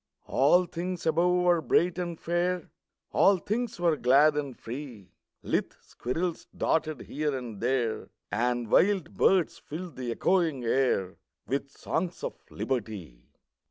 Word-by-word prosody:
All 175 Hz, +7 st, +4 dB
things 175 Hz, +1 st, -4 dB
above 180 Hz, +2 st, +3 dB
were 175 Hz, -2 st, +4 dB
bright 175 Hz, +3 st, +2 dB
and 175 Hz, -2 st, -4 dB
fair, 175 Hz, +1 st, -1 dB, 0.4 s
All 195 Hz, 0 st, +5 dB
things 220 Hz, +3 st, -3 dB
were 170 Hz, -2 st, +3 dB
glad 145 Hz, +3 st, +5 dB
and 140 Hz, -4 st, -3 dB
free; 120 Hz, -5 st, -8 dB, 0.3 s
Lithe -, -, -1 dB
squirrels 165 Hz, +8 st, -4 dB
darted 155 Hz, -3 st, 0 dB
here 150 Hz, -1 st, -2 dB
and 120 Hz, -5 st, -7 dB
there, 120 Hz, -2 st, 0 dB, 0.2 s
And 120 Hz, 0 st, 0 dB
wild 190 Hz, -4 st, +3 dB
birds 185 Hz, -4 st, +2 dB
filled 170 Hz, +2 st, -8 dB
the 125 Hz, -2 st, -4 dB
echoing 160 Hz, +1 st, +1 dB
air 115 Hz, -6 st, +1 dB, 0.3 s
With 140 Hz, +1 st, -2 dB
songs 170 Hz, +5 st, -3 dB
of -, -, -2 dB, 0.2 s
Liberty! 100 Hz, -, -4 dB
155 Hz, 130 wpm, -28 LUFS, 125-175 Hz, 0.4 s, All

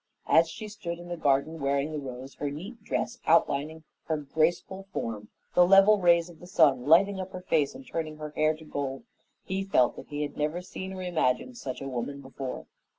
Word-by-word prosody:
As 165 Hz, 0 st, +5 dB
she 215 Hz, +5 st, -7 dB
stood 205 Hz, -5 st, -6 dB
in 175 Hz, 0 st, -10 dB
the 175 Hz, -, -2 dB
garden, 145 Hz, +1 st, +1 dB
wearing 140 Hz, +1 st, 0 dB
the 155 Hz, -, -3 dB
rose, 130 Hz, 0 st, -8 dB
her 145 Hz, -, -3 dB
neat 195 Hz, -, -8 dB
dress 210 Hz, -, -2 dB
outlining 160 Hz, -1 st, +2 dB, 0.2 s
her 160 Hz, -, 0 dB
graceful 160 Hz, +6 st, -1 dB
form, 105 Hz, -, -4 dB, 0.2 s
the 180 Hz, -, +6 dB
level 195 Hz, +3 st, +7 dB
rays 170 Hz, -1 st, +5 dB
of 170 Hz, -2 st, -14 dB
the 175 Hz, -, -12 dB
sun 145 Hz, -8 st, +3 dB
lighting 190 Hz, +5 st, +5 dB
up 190 Hz, 0 st, -6 dB
her 185 Hz, -, -6 dB
face 155 Hz, -6 st, +1 dB
and 265 Hz, -, -10 dB
turning 155 Hz, -6 st, -4 dB
her 150 Hz, -1 st, -6 dB
hair 155 Hz, +1 st, +2 dB
to 160 Hz, 0 st, -14 dB
gold, 140 Hz, +2 st, -4 dB, 0.4 s
he 190 Hz, +1 st, -2 dB
felt 160 Hz, -11 st, +3 dB
that -, -, -9 dB
he 150 Hz, 0 st, -3 dB
had 145 Hz, -, -5 dB
never 155 Hz, +3 st, -1 dB
seen 190 Hz, +1 st, -7 dB
or 185 Hz, -1 st, -6 dB
imagined 175 Hz, -, 0 dB
such 130 Hz, -1 st, -5 dB
a -, -, -4 dB
woman 135 Hz, +2 st, -4 dB
before. 135 Hz, -1 st, -6 dB
160 Hz, 210 wpm, -28 LUFS, 140-180 Hz, 0.4 s, level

